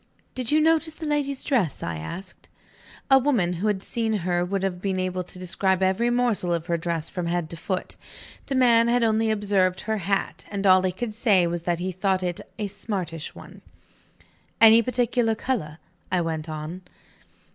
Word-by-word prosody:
"Did 250 -3 -2
you 305 - +5
notice 320 0 +2
the 320 - -7
lady's 285 -2 -1
dress?" 225 - 0
I 85 -1 -3
asked. 175 - -9 0.6
A 270 - +8
woman 240 -11 +1
who 215 - +1
had 200 -2 0
seen 225 -2 -2
her 175 -3 0
would 195 +2 -2
have 180 -2 -2
been 190 -1 -1
able 185 0 -2
to 180 - -12
describe 190 +1 0
every 190 +6 +2
morsel 240 -8 +1
of 165 -1 -4
her 170 -1 0
dress 165 -1 -2
from 180 -2 -4
head 170 -2 -2
to - - -5
foot. 185 +2 -4 0.5
The 275 - -2
man 235 -3 +5
had 240 0 +2
only 220 0 +2
observed 200 -3 +1
her 220 0 -2
hat; 195 +1 -2
and 200 -1 -3
all 185 -1 +7
he 185 0 0
could 220 +4 -4
say 210 -5 +3
was 170 0 -2
that 170 - +2
he 185 +2 -3
thought 185 0 0
it 175 -1 -2 0.2
"a 210 - -2
smartish 190 -6 -5
one." - - -12 1.0
"Any 225 0 +8
particular 240 -1 +1
color?" 200 -11 -3 0.3
I 180 -1 +2
went 160 -1 -3
on. 155 +4 -6
195 Hz, 190 wpm, -25 LUFS, 175-230 Hz, 1.0 s, A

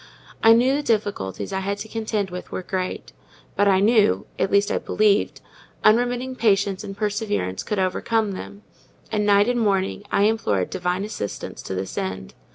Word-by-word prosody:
I 225 0 +8
knew 250 +4 +4
the 290 - 0
difficulties 205 - -2
I 190 - 0
had 200 +1 -2
to 205 +2 -7
contend 215 -3 -2
with 180 0 -7
were 185 - -4
great; 185 0 -4 0.4
but 205 - +3
I 190 -1 +4
knew 205 - +3
(at 190 - +1
least 200 +1 +2
I - - +1
believed) 210 -1 +1 0.4
unremitting 245 +4 +2
patience 200 -3 +2
and 195 -1 -7
perseverance 205 - -2
could 210 - -3
overcome 205 +3 0
them; 200 +2 -8 0.5
and 210 -1 0
night 205 +1 +5
and 245 0 +1
morning 195 -3 0
I 200 - +3
implored 155 - +1
Divine 180 +2 -1
assistance 155 - -6
to 95 - -5
this 95 +1 -4
end. 95 0 -5
205 Hz, 170 wpm, -23 LUFS, 185-220 Hz, 0.5 s, I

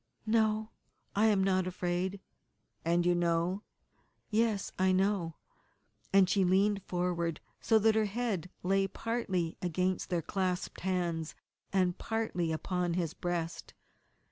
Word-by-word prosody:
"No, 220 0 +2 0.4
I 215 +2 +4
am 200 -3 +3
not 185 -1 +2
afraid." 180 +2 -2 0.6
"And 170 +1 +2
you 175 - +4
know 175 +2 +1 0.3
" - - -38 0.3
"Yes, 215 -2 +1
I 185 0 +4
know," 185 -3 +1 0.8
and 195 -1 +6
she 195 +1 +3
leaned 195 +2 +3
forward 175 -2 -1 0.2
so 225 - +4
that 220 +1 +4
her 220 0 +2
head 205 -5 -2
lay 195 +1 +2
partly 195 -6 -2
against 180 +1 0
their 170 -2 0
clasped 185 0 -2
hands 175 -4 -1 0.4
and 185 -2 +1
partly 220 -7 -1
upon 175 +1 -1
his 170 -3 -1
breast. 170 -1 -4
185 Hz, 130 wpm, -32 LUFS, 175-205 Hz, 0.8 s, and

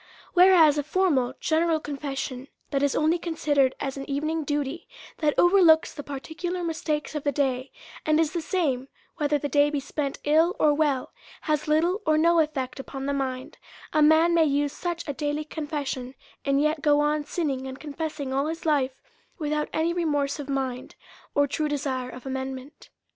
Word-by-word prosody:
Whereas 350 -5 +6
a - - -1
formal, 290 -6 +1
general 320 0 +1
confession, 275 -3 -5 0.2
that 275 - +1
is 285 -1 +1
only 315 +3 +2
considered 290 -6 +1
as 270 0 -3
an 275 - -7
evening 310 +3 -1
duty, 290 +2 -3 0.3
that 300 -2 +1
overlooks 350 -3 +5
the 290 - -6
par 280 -1 -6
ticular 350 +4 -4
mistakes 310 -2 -2
of 300 -2 -3
the 285 - +1
day, 265 -1 -1 0.3
and 310 0 +2
is 315 -1 +1
the 340 - -1
same 285 -8 -1 0.3
whether 295 0 +1
the 290 - -3
day 290 +1 +3
be 295 -1 -1
spent 280 0 -3
ill 320 +4 +3
or 300 -1 +4
well, 290 -4 0 0.3
has 305 -1 -1
little 340 +7 +2
or 310 -3 +3
no 335 +2 +4
effect 285 -4 -1
upon 270 0 -6
the 280 - 0
mind; 260 -2 -4 0.3
a 305 - +3
man 315 +3 +5
may 330 -1 +5
use 285 0 0
such 345 -2 -4
a 285 - -2
daily 295 +1 -2
confession, 290 -4 -4 0.3
and 275 0 +2
yet 305 0 0
go 290 0 +4
on 295 0 +1
sinning 285 -4 -2
and 265 0 -8
confessing 300 -2 -4
all 275 +2 +1
his 325 +1 -5
life, 270 -4 0 0.3
without 300 -2 -1
any 325 +2 0
remorse 295 -4 0
of 285 -1 -6
mind, 260 -2 -3 0.4
or 285 - +4
true 300 +2 -2
desire 265 -3 -2
of 250 +1 -10
amendment. 265 +2 -6
295 Hz, 180 wpm, -26 LUFS, 275-315 Hz, 0.4 s, Whereas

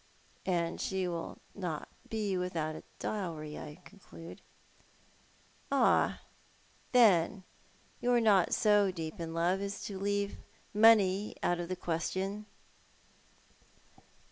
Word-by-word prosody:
" - - -32
And 170 -2 0
she 190 -1 -1
will 170 -1 -4 0.2
not 175 -6 -4 0.2
be 210 -3 -1
without 170 -4 -2
a - - -8 0.2
dowry, 160 -7 -4
I 150 +4 -9
conclude." 180 -4 -12 0.7
* - - -32
Ah, 275 - +3 0.7
then, 200 -5 +5 0.6
you 245 - +1
are 240 - +5
not 205 -6 +4
so 205 -2 +4
deep 165 0 -5
in 165 -1 -5
love 175 +3 +1
as 200 0 -4
to 195 -2 -5
leave 200 0 -1 0.4
money 210 -2 +5
out 175 0 +1
of 175 0 -4
the 185 - -1
question." 190 +5 -3
190 Hz, 120 wpm, -32 LUFS, 170-205 Hz, 0.7 s, then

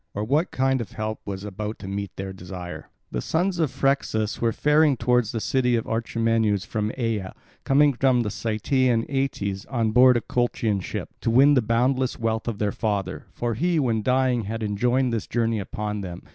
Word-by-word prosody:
Or 105 - -1
what 145 +10 +1
kind 135 -1 +1
of 115 - -7
help 110 0 -3
was 100 -1 -5
about 105 +2 -5
to 95 - -9
meet 100 -1 -4
their 95 0 -5
desire? 90 -1 -8 0.2
The 60 - -2
sons 180 - 0
of 160 -4 +2
Phrixus 125 -6 0
were 115 -1 +2
faring 150 +1 +3
towards 120 -1 +2
the 115 - -2
city 125 +1 +1
of 115 - -1
Orchomenus 115 -3 0
from 105 +1 -2
Aea, 110 -6 -2 0.3
coming 145 +1 +4
from 125 -1 +2
Cytaean 115 +3 0
Aeetes, 105 -8 -2
on 115 -4 0
board 125 +2 +6
a - - -1
Colchian 115 -4 0
ship, - - -5
to - - 0
win 135 +5 +6
the 130 - +4
boundless 125 +3 +1
wealth 110 0 -2
of 115 -3 -2
their 105 -1 0
father; 100 -4 -3
for 120 -1 -2
he, 170 +8 +1
when 115 -6 +1
dying, 125 -1 +1
had 110 +2 -4
enjoined 120 +4 +1
this 110 -3 -2
journey 115 -2 0
upon 105 +1 -4
them. 90 -3 -7
115 Hz, 185 wpm, -24 LUFS, 105-130 Hz, 0.3 s, board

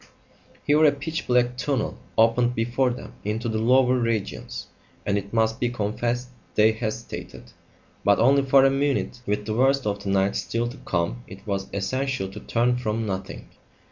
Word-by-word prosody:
Here 150 +2 +4
a 150 - +7
pitch 155 +4 -4
black 125 0 +2
tunnel 135 -3 -1 0.2
opened 120 +2 +3
before 120 +3 +1
them 125 0 -7
into 110 +3 -2
the 110 -1 -1
lower 125 +2 +4
regions, 115 -4 -2 0.4
and 100 - +1
it 100 0 -3
must 110 0 +1
be 120 - +1
confessed 120 +2 -2 0.3
they 110 +1 +5
hesitated. 110 0 -6 0.5
But 100 - +4
only 135 +4 +5
for 135 0 +5
a 135 - +5
minute. 135 -3 0
With 105 0 -1
the 110 - -2
worst 135 +3 +2
of 100 -1 -1
the 100 - -3
night 95 0 +2
still 115 +1 -1
to 130 - -10
come 90 +8 -1
it 95 +1 -12
was 100 -1 -2
essential 130 +1 -2
to 100 +2 -9
turn 120 +3 +1
from 115 -2 -2
nothing. 95 -2 -5
115 Hz, 175 wpm, -25 LUFS, 105-130 Hz, 0.5 s, a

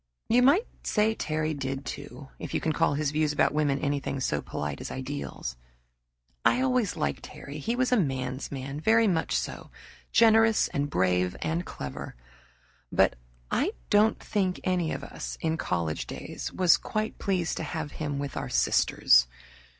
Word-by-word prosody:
You 240 +2 +5
might 295 - +5 0.2
say 215 +1 +2
Terry 155 -5 -1
did, 135 -1 -4
too, 130 +4 -7
if - - -5
you - - +2
can 160 - 0
call 165 -2 +2
his 145 -1 0
views 155 0 +1
about 150 - +2
women 145 -2 +2
anything 140 -1 -2
so 75 - 0
polite 75 +1 -4
as - - -5
ideals. 130 - -5 0.9
I - - +4
always 255 -6 +1
liked 70 -1 -1
Terry. 140 +2 -9
He 230 +11 -1
was 255 0 +1
a 250 - +5
man's 130 - -2
man, 135 +1 -5
very 225 +6 +4
much 165 -4 +1
so, - - -5 0.4
generous 225 -1 +5
and 145 +1 -1
brave 90 -4 +1
and 165 +2 -1
clever; 70 -3 -6 0.8
but - - +3 0.4
I - - +1 0.2
don't 215 +2 +5
think 190 -4 -1
any 180 -3 +1
of 135 - -4
us - - -6
in 160 0 0
college 85 - -2
days - - -6
was 180 -2 +5
quite 215 0 -3
pleased 180 -4 0
to - - -3
have 160 -1 -4
him 145 -2 -3
with 140 -1 -4
our - - -3
sisters. - - +4
150 Hz, 165 wpm, -28 LUFS, 135-195 Hz, 0.9 s, You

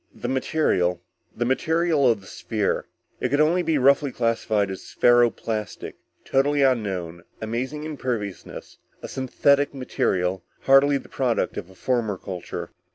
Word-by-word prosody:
"The - - -5
material... 110 - +1 0.4
the 120 - 0
material 160 +1 +2
of 110 -4 +1
the - - -17
sphere. 105 0 -2 0.3
It - - -1
could 145 - +1
only 165 +4 +3
be 165 -3 +1
roughly 140 +1 +4
classified 110 -4 0
as 95 - -8
ferro 120 0 +5
plastic. 110 -2 -5 0.3
Totally 140 +1 +2
unknown, 95 -10 0 0.2
amazing 125 +7 -3
imperviousness. 125 - -5 0.2
A - - -4
synthetic 140 +2 +1
material, 95 -8 -1 0.2
hardly 140 +1 +5
the - - -11
product 125 -3 -1
of 85 - -6
a 95 - -16
former 110 -2 -1
culture." 90 -2 -6
125 Hz, 140 wpm, -24 LUFS, 100-140 Hz, 0.4 s, ferro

